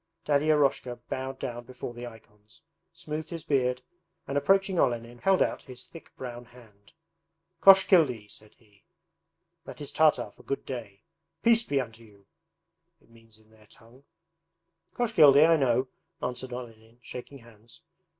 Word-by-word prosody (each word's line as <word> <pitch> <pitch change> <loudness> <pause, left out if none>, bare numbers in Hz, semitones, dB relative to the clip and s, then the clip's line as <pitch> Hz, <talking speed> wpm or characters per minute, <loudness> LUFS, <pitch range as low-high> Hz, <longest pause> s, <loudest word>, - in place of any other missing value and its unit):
Daddy 145 +1 +2
Eroshka 140 -4 +2
bowed 130 0 -4
down 120 -2 -6
before 125 -1 -8
the 120 +1 -8
icons, 110 -1 -16 0.3
smoothed 160 -1 -6
his 165 -3 -6
beard, 125 -3 0 0.4
and 140 - -4
approaching 195 +5 +2
Olenin 120 0 -1
held 190 +5 +3
out - - -3
his 125 -2 -11
thick 165 - -14
brown 120 -1 -8
hand. 110 -5 -20 0.7
'Koshkildy,' 165 - +5
said 110 0 -17
he; 105 -3 -28 0.8
That - - -10
is 145 - -6
Tartar 155 -1 +2
for - - -19
"Good 140 - -4
day" 110 -6 -8 0.4
"Peace 230 -1 +5
be 145 -12 -1
unto 115 -3 -7
you," 100 -3 -20 0.7
it - - -28
means 115 -1 -18
in 110 0 -26
their 110 -1 -22
tongue.' 120 +4 -19 0.9
'Koshkildy, 155 - +6
I 165 - +5
know,' 130 -3 +1 0.3
answered 125 +1 -5
Olenin, 115 -2 -10
shaking 125 +3 -9
hands. 115 -2 -17
125 Hz, 145 wpm, -28 LUFS, 115-145 Hz, 0.9 s, Koshkildy